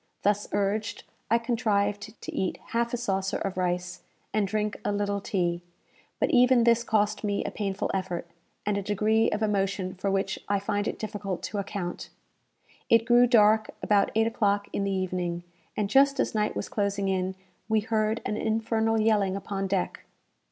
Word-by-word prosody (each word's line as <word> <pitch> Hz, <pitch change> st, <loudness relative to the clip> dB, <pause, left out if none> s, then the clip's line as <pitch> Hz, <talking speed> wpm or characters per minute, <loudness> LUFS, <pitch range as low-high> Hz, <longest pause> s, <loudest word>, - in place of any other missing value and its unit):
Thus 205 Hz, +1 st, +1 dB
urged, 205 Hz, +1 st, -1 dB, 0.3 s
I 230 Hz, -, +5 dB
contrived 215 Hz, -3 st, -1 dB
to -, -, -6 dB
eat 185 Hz, -, -1 dB
half 235 Hz, 0 st, 0 dB
a 245 Hz, -, -1 dB
saucer 195 Hz, -5 st, -1 dB
of 195 Hz, -2 st, -3 dB
rice, 180 Hz, 0 st, -2 dB, 0.3 s
and 210 Hz, -2 st, +2 dB
drink 210 Hz, +1 st, -1 dB
a -, -, 0 dB
little 205 Hz, 0 st, -1 dB
tea; 175 Hz, -3 st, -1 dB, 0.6 s
but -, -, +2 dB
even 250 Hz, -1 st, +5 dB
this 235 Hz, 0 st, +4 dB
cost 215 Hz, -2 st, +1 dB
me 205 Hz, -1 st, 0 dB
a -, -, -2 dB
painful 200 Hz, -2 st, -2 dB
effort, 185 Hz, -3 st, -2 dB, 0.4 s
and 205 Hz, -1 st, +1 dB
a -, -, -3 dB
degree 215 Hz, +3 st, +2 dB
of 210 Hz, +1 st, -1 dB
emotion 195 Hz, -2 st, 0 dB
for 195 Hz, +1 st, -2 dB
which 195 Hz, 0 st, -1 dB
I 200 Hz, -1 st, +2 dB
find 205 Hz, +1 st, -1 dB
it -, -, -3 dB
difficult 200 Hz, -4 st, -4 dB
to 205 Hz, -, -3 dB
account. 190 Hz, -3 st, -4 dB, 0.8 s
It 230 Hz, 0 st, +5 dB
grew 240 Hz, +1 st, +6 dB
dark 220 Hz, -2 st, +5 dB
about 205 Hz, -1 st, +3 dB
eight 225 Hz, 0 st, +4 dB
o'clock 205 Hz, -3 st, +1 dB
in 200 Hz, -, 0 dB
the 200 Hz, -, 0 dB
evening, 180 Hz, -2 st, -2 dB, 0.3 s
and 210 Hz, -, +1 dB
just 275 Hz, +4 st, +4 dB
as -, -, +1 dB
night 210 Hz, -1 st, 0 dB
was -, -, -3 dB
closing 200 Hz, -1 st, -1 dB
in, 190 Hz, 0 st, -1 dB, 0.3 s
we 220 Hz, -1 st, +3 dB
heard 220 Hz, 0 st, 0 dB
an 210 Hz, -, -1 dB
infernal 225 Hz, 0 st, +1 dB
yelling 210 Hz, -3 st, +2 dB
upon 195 Hz, 0 st, -3 dB
deck. 190 Hz, -1 st, -2 dB
205 Hz, 175 wpm, -27 LUFS, 195-220 Hz, 0.8 s, grew